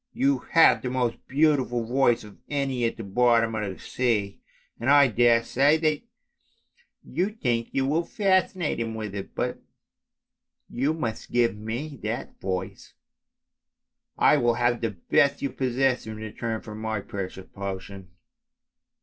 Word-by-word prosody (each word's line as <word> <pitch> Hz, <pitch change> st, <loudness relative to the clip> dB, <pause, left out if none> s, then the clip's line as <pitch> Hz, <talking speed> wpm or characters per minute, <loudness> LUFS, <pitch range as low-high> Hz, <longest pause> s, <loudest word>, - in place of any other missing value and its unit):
You 275 Hz, +3 st, +2 dB
have 165 Hz, -, +6 dB
the 125 Hz, -, -3 dB
most 125 Hz, -2 st, -2 dB
beautiful 135 Hz, -5 st, +2 dB
voice 120 Hz, -1 st, +2 dB
of 105 Hz, -1 st, -14 dB
any 135 Hz, -4 st, -1 dB
at 115 Hz, -, -2 dB
the 115 Hz, -, -6 dB
bottom 115 Hz, +2 st, +2 dB
of 105 Hz, -3 st, -2 dB
the 95 Hz, -, -10 dB
sea, 105 Hz, -6 st, -1 dB, 0.4 s
and 120 Hz, -, -1 dB
I 145 Hz, 0 st, +7 dB
daresay 120 Hz, +5 st, +3 dB
that 155 Hz, -2 st, 0 dB, 1.0 s
you 185 Hz, +3 st, -1 dB
think 120 Hz, -, -1 dB
you 135 Hz, -, 0 dB
will 155 Hz, +5 st, +1 dB
fascinate 185 Hz, -, +1 dB
him 115 Hz, -1 st, -3 dB
with 105 Hz, -2 st, -5 dB
it, 100 Hz, -1 st, -7 dB
but -, -, -2 dB, 1.1 s
you 140 Hz, +6 st, -1 dB
must 115 Hz, -9 st, -4 dB
give 120 Hz, -4 st, +2 dB
me 120 Hz, +7 st, -5 dB
that 110 Hz, +3 st, -5 dB
voice, 95 Hz, -1 st, -5 dB, 1.2 s
I 150 Hz, -, +5 dB
will 120 Hz, -3 st, +2 dB
have 120 Hz, 0 st, +1 dB
the 115 Hz, -, 0 dB
best 140 Hz, +7 st, +1 dB
you 140 Hz, -, -1 dB
possess 130 Hz, -1 st, 0 dB
in 110 Hz, -, -5 dB
return 110 Hz, +1 st, -4 dB
for 105 Hz, -, -9 dB
my 110 Hz, 0 st, -3 dB
precious 95 Hz, -1 st, -6 dB
potion! 100 Hz, -1 st, -6 dB
120 Hz, 145 wpm, -26 LUFS, 110-140 Hz, 1.2 s, I